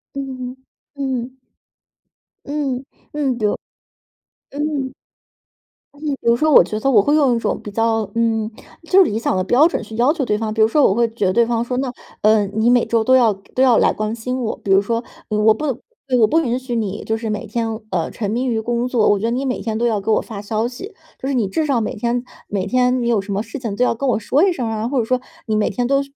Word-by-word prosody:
嗯 260 -2 -5 0.4
嗯， 265 -4 -2
嗯。 260 - -30 1.1
嗯， 280 -3 -2 0.3
嗯， 275 -5 0
比 215 - -1
如 205 - +1 0.9
嗯。 285 -2 -2 1.0
嗯， 285 - -19 0.2
比 - - -20
如 235 0 +5
说 310 +3 +2
我 - - +9
觉 215 +5 -4
得 270 - +1
我 225 -6 +6
会 290 - +1
用 275 -5 +3
一 - - 0
种 - - -2
比 - - -7
较 225 0 0
嗯， 225 -1 +1 0.4
就 385 +1 +7
是 325 - -1
理 220 - -1
想 230 - 0
的 185 - +1
标 270 - +5
准 335 - -3
去 220 0 -11
要 250 +5 +4
求 310 -5 -2
对 210 -3 0
方， 220 -1 -3
比 220 - 0
如 220 - +6
说 295 +5 +3
我 195 - +2
会 235 +1 +3
觉 225 -3 -2
得 185 - +2
对 235 +3 +4
方 230 0 0
说， 245 +1 -2
那， 265 -2 -2 0.3
呃， 215 -1 +4
你 220 +4 +1
每 245 -1 +4
周 230 -1 +1
都 255 - +3
要 240 -4 +5
都 195 +6 -5
要 250 -3 +5
来 - - +4
关 215 +1 -3
心 250 +3 -3
我， 225 - -2
比 195 - -1
如 195 +1 +6
说 230 +3 -2 0.2
我 215 0 +3
不 260 +8 -4 0.5
我 225 - +6
不 315 +10 +2
允 250 -6 0
许 255 -2 -4
你 210 -2 -3
就 220 0 -1
是 225 -1 -4
每 215 +2 -3
天， 225 +1 -2 0.2
呃， 170 -5 -1
沉 210 -2 -4
迷 245 +3 -1
于 225 -3 0
工 240 +2 -1
作， 240 -4 +2
我 205 - +3
觉 215 - -2
得 230 - 0
你 260 +3 -1
每 255 -2 -2
天 220 -1 -3
都 235 - 0
要 220 -3 +1
给 200 - -5
我 - - +3
发 210 -4 -8
消 215 +2 -1
息， 320 - -7 0.3
就 265 - -4
是 280 - -1
你 235 -4 +2
至 315 +10 0
少 265 -6 +1
每 - - -2
天 240 +3 -1 0.2
每 195 -2 -2
天 250 +1 +2
你 235 - 0
有 230 -3 +3
什 200 +1 -4
么 205 +3 -1
事 225 +5 -7
情 225 -5 -4
都 245 - +1
要 250 - +2
跟 275 +4 -3
我 - - +1
说 270 +6 +1
一 370 - +2
声 255 -7 -3
儿 225 - -2
啊， 225 - -1
或 270 - -2
者 240 - +2
说 255 +3 0 0.3
你 215 -1 +1
每 215 - +1
天 245 - -2
都 275 +2 +2
235 Hz, 280 characters per minute, -19 LUFS, 215-255 Hz, 1.1 s, 我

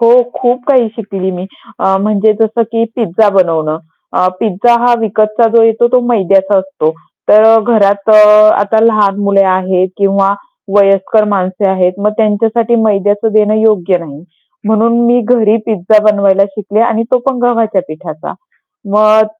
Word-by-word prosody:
हो, 240 +2 +4 0.2
खूप 245 0 -1
काही 255 -5 +2
शिकली 195 -4 -5
मी. 180 0 -7 0.3
अ, 190 0 +1
म्हणजे 210 +1 +1
जसं 225 +1 0
की 230 0 0
पिझ्झा 215 -2 0
बनवणं. 165 -5 -1 0.3
अ, 180 - 0
पिझ्झा 225 +3 +1
हा 245 - +3
विकतचा 215 +1 0
जो 230 - +5
येतो 225 +1 +2
तो 250 - +3
मैद्याचा 195 -3 +1
असतो, 190 -5 -3 0.4
तर 220 +2 +5
घरात 205 -2 0
अ, - - +6 0.5
आता 205 +2 0
लहान 210 -3 +1
मुले 200 -1 +2
आहेत 185 0 -1
किंवा 195 0 +1 0.4
वयस्कर 195 +2 +2
माणसे 190 0 -2
आहेत, 185 -1 0
मग 210 +1 0
त्यांच्यासाठी 225 +2 0
मैद्याचं 205 +1 -1
देणं 215 0 +1
योग्य 195 -5 +1
नाही 155 -2 -12 0.4
म्हणून 220 +2 +1
मी 245 +1 +2
घरी 225 -1 +1
पिझ्झा 215 0 +1
बनवायला 200 -2 +2
शिकले 205 +1 -4
आणि 230 -1 0
तो 255 - +3
पण 265 -2 -1
गव्हाच्या 230 -5 0
पिठाचा. 155 0 -9 0.6
मग 215 +1 +3
210 Hz, 150 wpm, -11 LUFS, 195-225 Hz, 0.6 s, अ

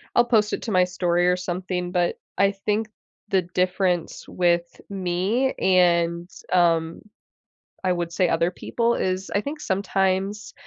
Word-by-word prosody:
I'll 240 - +5
post 215 -3 +2
it - - -2
to 225 - -3
my 185 -1 +4
story 175 -1 +1
or 180 0 +3
something 180 0 -3
but, 175 -1 +1 0.2
I 200 0 +4
think 210 +2 -2 0.4
the 190 -2 +2
difference 180 0 -1
with 175 -1 0
me 195 +7 0
and, 170 -1 +2 0.2
um, 165 -2 +2 0.8
I 185 - +2
would 175 -1 -2
say 180 0 +1
other 170 +2 +1
people 235 +5 -1
is 185 +1 -2
I 200 - +2
think 300 +4 -6
sometimes 195 0 -1
185 Hz, 145 wpm, -24 LUFS, 175-200 Hz, 0.8 s, I'll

